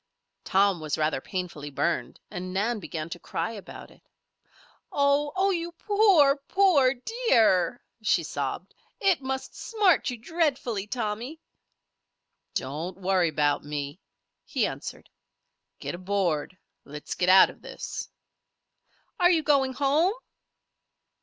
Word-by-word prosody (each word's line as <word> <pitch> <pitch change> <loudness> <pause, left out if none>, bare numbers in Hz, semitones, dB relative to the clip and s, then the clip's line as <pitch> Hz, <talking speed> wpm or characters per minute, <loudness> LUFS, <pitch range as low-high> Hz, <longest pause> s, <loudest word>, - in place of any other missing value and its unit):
Tom 195 -2 +3
was 155 -2 -2
rather 155 -3 0
painfully 175 -5 -5
burned 165 +4 -2
and 185 -2 -5
Nan 215 +5 0
began 160 -5 -5
to 175 - -6
cry 165 +4 -3
about 205 -4 -10
it. - - -20 0.9
"Oh! 285 +1 +2
Oh! 385 +1 +3
You 340 -1 -3
poor, 375 -8 +4
poor 280 -4 +3
dear!" 245 - +2 0.2
she 215 - +2
sobbed. - - -4 0.3
"It 385 -7 +2
must 265 0 -4
smart 410 -10 +2
you 250 - -4
dreadfully, 255 - -1
Tommy." 235 +6 -4 1.2
"Don't 155 +8 -3
worry 185 -2 +2
about 145 -1 +1
me," 145 +2 -5 0.4
he - - 0
answered. - - -6 0.7
"Get - - -5
aboard. 185 -3 -1 0.3
Let's 150 +1 -7
get 180 - 0
out 190 +1 +8
of - - -20
this." - - -6 1.1
"Are 355 -1 +6
you 330 -3 +3
going 275 -3 +3
home?" 295 - +2
225 Hz, 120 wpm, -27 LUFS, 180-295 Hz, 1.2 s, out